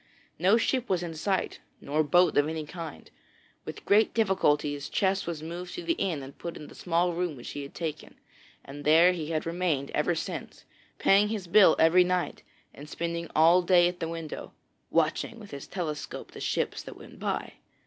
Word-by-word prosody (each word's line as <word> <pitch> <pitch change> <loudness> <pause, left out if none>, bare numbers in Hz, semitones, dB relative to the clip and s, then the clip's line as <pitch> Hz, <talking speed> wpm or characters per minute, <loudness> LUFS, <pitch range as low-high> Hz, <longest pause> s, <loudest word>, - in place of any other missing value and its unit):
No 190 +6 +5
ship 250 +1 0
was 180 -2 +1
in 170 -2 -5
sight, 190 +5 -2 0.2
nor 150 +2 0
boat 175 +5 +3
of 145 +1 +3
any 160 -1 -4
kind. 165 -1 -9 0.5
With - - -8
great 215 +2 +3
difficulty 185 -9 +2
his 145 0 -6
chest 195 -1 0
was 160 -3 -4
moved 175 +2 -6
to 355 - -6
the 335 - +1
inn 175 - -2
and 135 +1 -10
put 170 - -7
in 150 - -10
the - - -13
small 175 0 0
room 175 -2 -2
which 120 - -8
he 145 - -5
had 140 - -10
taken, 155 -3 -5 0.5
and 145 +1 -9
there 165 +4 +6
he 160 -4 -4
had 155 -1 -2
remained 165 -5 -1
ever 160 +3 +1
since, - - -6 0.3
paying 200 +2 +4
his 210 -3 -4
bill 180 0 +6
every 170 +3 +6
night 180 0 -1 0.3
and 150 +2 -11
spending 170 0 -4
all 165 +3 +6
day 175 -1 +5
at 175 0 -4
the 165 - -3
window, 165 -2 -7 0.4
watching 230 - 0
with 210 -2 -12
his 140 -1 -8
telescope 155 -6 -5
the - - -10
ships - - -1
that - - -10
went - - -14
by. - - -3
170 Hz, 195 wpm, -28 LUFS, 155-185 Hz, 0.5 s, there